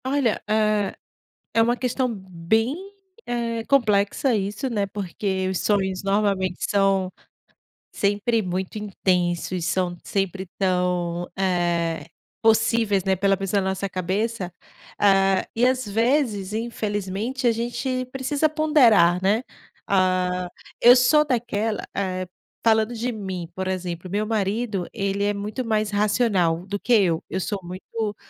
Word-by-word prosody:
Olha, 260 -4 +1
hã, 215 -2 +2 0.6
é 225 - +4
uma 240 +2 +3
questão 255 +1 -1
bem, 195 - -1 0.5
eh, 230 -1 -2
complexa 230 0 +2
isso, 210 +5 -2
né, 210 -4 0
porque 190 -1 -3
os 190 - -1
sonhos, 190 -3 0
normalmente, 195 -2 0
são 195 -2 +2 0.8
sempre 205 +3 +1
muito 185 +1 -3
intensos, 180 -3 -1
são 180 0 0
sempre 195 -1 -2
tão, 180 -2 0
eh, 175 -3 0 0.3
possíveis, 220 -3 +3
né, 190 0 +2
pela 195 +1 +2
pessoa, 195 +1 0
na 190 - -1
nossa 190 +1 -2
cabeça, 190 +2 -2 0.5
hã, 195 -1 +4
e 230 - 0
às 255 -2 0
vezes, 225 -2 +1
infelizmente, 220 +2 -3
a 240 - +5
gente 255 +3 -2
precisa 275 +4 0
ponderar, 245 - +4
né. 205 +5 +2 0.4
Hã, 185 -1 +1 0.3
eu 245 +1 +9
sou 260 +4 +5
daquela, 230 -5 -1
eh, 185 -2 -2 0.4
falando 220 +1 +3
de 240 +2 -2
mim, 190 -6 -5
por 190 0 -3
exemplo, 180 -1 -4
meu 205 +3 -1
marido, 210 -2 -1
ele 200 -1 -1
é 205 0 +1
muito 210 +5 -4
mais 215 -2 0
racional 205 -5 +1
do 200 +1 -4
que 245 - -4
eu, 180 -7 +3
eu 190 - -2
sou 200 +2 -2
muito 205 +4 -5
200 Hz, 130 wpm, -23 LUFS, 185-230 Hz, 0.8 s, eu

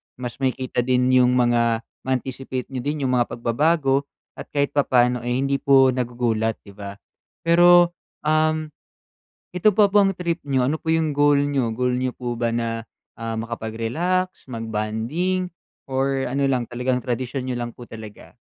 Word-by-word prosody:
mas 125 0 -7
makikita 130 -2 -1
din 125 +1 +2
yung 125 -1 +4
mga 120 -2 +2 0.2
ma-anticipate 130 0 -3
niyo 130 - -3
din 145 +3 -3
yung 130 - +1
mga 120 - +2
pagbabago 140 +3 +1 0.3
at - - -6
kahit 140 -1 +1
papano, 125 -3 +2
eh, 120 0 0
hindi 135 +1 +1
po 135 -1 +5
nagugulat, 120 -3 -1
'di 100 - -13
ba. 100 0 -8 0.5
Pero, 175 +1 +6 0.3
um, 155 0 +1 0.8
ito 180 +4 +4
ba 205 0 +4
pong 200 -1 +4
trip 170 -2 -2
niyo, 130 -3 +1
ano 150 - +1
po 160 - -1
yung 160 -2 +1
goal 145 0 +4
niyo? 135 -5 0
Goal 125 +2 0
niyo 130 0 -1
po 120 -1 -5
ba 115 0 -1
na, 115 -1 -2 0.3
ah, 115 -1 -4
makapag-relax, 115 +12 -2
mag 115 -1 -5
bonding 115 +13 -1 0.4
or 135 0 0
ano 140 +3 -1
lang, 125 -3 0
talagang 125 +1 -1
tradisyon 125 +1 -3
niyo 125 - -2
lang 120 - -5
po 120 0 -13
talaga? 110 -2 -11
130 Hz, 160 wpm, -22 LUFS, 120-145 Hz, 0.8 s, Pero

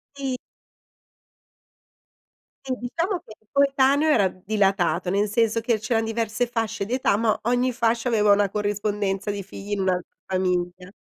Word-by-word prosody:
Sì. 270 -2 -3 2.3
Sì, 260 - -1
diciamo 335 - -2
che 215 - -12
il 220 - -36
coetaneo 280 +2 +3
era 205 -10 +4
d 185 0 -12
dilatato, 195 -4 +1
cioè 195 - 0
nel 205 0 +1
senso 230 0 +1
che 230 -2 +1
c'erano 225 +1 0
diverse 225 +1 -1
fasce 225 -3 -2
di 235 - -4
età, 255 -5 +2
ma 220 0 +1
ogni 245 +2 +1
fascia 235 0 0
aveva 210 -3 +4
una 200 -1 +2
corrispondenza 205 -1 -1
di 200 -1 -5
figli 195 +2 -10
in 205 - 0
un'altra 180 -1 -1
famiglia. 180 -1 -1
215 Hz, 155 wpm, -24 LUFS, 200-245 Hz, 2.3 s, era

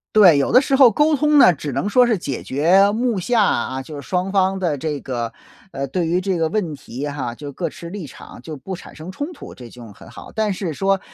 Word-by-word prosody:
对， 185 -8 +7
有 140 - +1
的 250 - +7
时 270 0 0
候 265 -3 +7
沟 300 +7 +3
通 300 +1 +2
呢， 180 - +7
只 145 -1 -6
能 165 - -2
说 250 +4 +4
是 235 -3 +1
解 140 -7 -5
决 180 +9 +3
目 235 0 -1
下 225 +5 +1
啊， 130 -7 -1
就 150 +3 -10
是 145 - -7
双 180 +5 -1
方 190 -1 +1
的 170 -6 -1
这 150 +1 -3
个， 120 -4 -4 0.4
呃， 140 0 -4
对 170 +6 -2
于 170 +2 +1
这 185 -1 -1
个 165 -1 0
问 180 -7 -2
题 135 +1 -7
哈， 140 -5 -4
就 145 +4 -9
各 170 - -3
持 170 - -10
立 195 -2 -7
场 130 - -12
就 155 +3 -8
不 190 +8 -6
产 - - -13
生 160 +3 -10
冲 290 - -5
突， 310 - -11
这 120 -2 -11
就 120 0 -12
很 - - -15
好。 - - -12
但 215 -1 0
是 180 -4 -4
说， 195 +4 +1
180 Hz, 270 characters per minute, -20 LUFS, 145-205 Hz, 0.4 s, 对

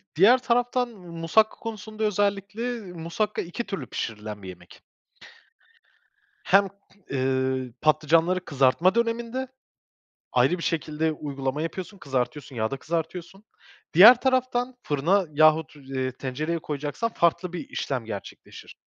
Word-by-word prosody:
diğer 205 +10 +7
taraftan 245 0 +1
musakka 180 +1 0
konusunda 220 -1 -6
özellikle 205 +1 -1
musakka 170 +6 -2
2 175 +7 -5
türlü 195 -3 -5
pişirilen 105 -2 -5
bir 95 - -7
yemek 90 -1 -13 1.6
hem, 195 +2 +4 0.4
ııı, 130 -1 -1
patlıcanları 160 +4 +2
kızartma 145 - +3
döneminde 235 +2 -1 0.8
ayrı 180 - +3
bir 165 - -7
şekilde 160 -1 -1
uygulama 140 -1 -4
yapıyorsun, 185 +5 -5
kızartıyorsun, 135 -2 -3
yağda 115 +4 -1
kızartıyorsun. 170 +6 -4 0.5
Diğer 220 +9 +9
taraftan 255 -1 0
fırına 170 +7 +2
yahut, 155 +1 +4
eee, 135 -2 -4
tencereye 145 +6 -3
koyacaksan 150 +9 -3
farklı 170 +1 +1
bir 175 - -6
işlem 130 -4 -3
gerçekleşir. 105 -3 -9
170 Hz, 110 wpm, -25 LUFS, 140-210 Hz, 1.6 s, Diğer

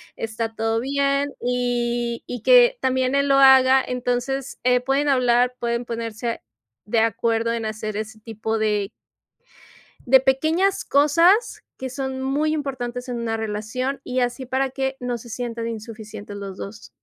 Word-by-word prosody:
está 225 0 -4
todo 225 0 0
bien", 275 +2 0
y 240 -1 -1
y 245 - -6
que - - +6
también 260 0 +1
él 280 0 +2
lo 275 0 +5
haga, 265 -1 +7
entonces, 250 +2 -3
eh, 250 0 +4
pueden 270 +3 0
hablar, 250 -1 +3
pueden 235 0 -2
ponerse 230 0 -4 0.5
de 225 +2 +2
acuerdo 225 +1 +1
en 230 -1 -2
hacer 215 -1 -4
ese 220 +1 -6
tipo 220 0 -3
de 210 -2 0 1.2
de 265 +1 +6
pequeñas 315 +9 +1
cosas 335 - +3 0.2
que 260 - -4
son 265 0 -4
muy 290 +4 0
importantes 250 -4 -4
en 245 - -3
una 230 -1 -2
relación 220 +5 -3
y 255 +1 -1
así 245 +1 -1
para 265 +2 0
que 265 0 -2
no 245 -1 -2
se 235 - -13
sientan 230 0 -4
insuficientes 215 -2 -8
los 195 -2 -7
dos. 205 +2 -8
245 Hz, 150 wpm, -22 LUFS, 225-270 Hz, 1.2 s, haga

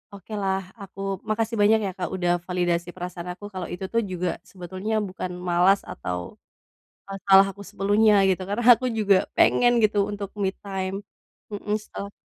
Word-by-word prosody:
oke 200 +2 -11
lah, 190 -1 -2
aku 195 0 -11 0.3
makasih 225 +1 -1
banyak 215 +2 +5
ya, 195 - -2
Kak, 180 -3 -3
udah 175 -1 +1 0.2
validasi 175 -1 0
perasaan 180 -1 -6
aku, 205 - -11
kalau 185 - -4
itu 185 +2 -5
tuh 230 - +3
juga 180 0 -1 0.2
sebetulnya 185 +3 -5
bukan 185 -1 -5
malas 180 +2 +3
atau, 90 -1 -6 0.7
eee, - - -4
salah 195 0 +8
aku 200 - -16
sepenuhnya 205 +2 +3
gitu, 190 0 +1
karena 210 +4 -2
aku 255 +3 -4
juga 200 -2 +4 0.2
pengen 245 0 +5
gitu, 210 -1 +2
untuk 200 -1 -5
me 195 - +2 0.2
time. 190 -1 -3 0.6
Mhm, 210 +1 -2
setelah 200 -1 -7
195 Hz, 165 wpm, -25 LUFS, 180-205 Hz, 0.7 s, salah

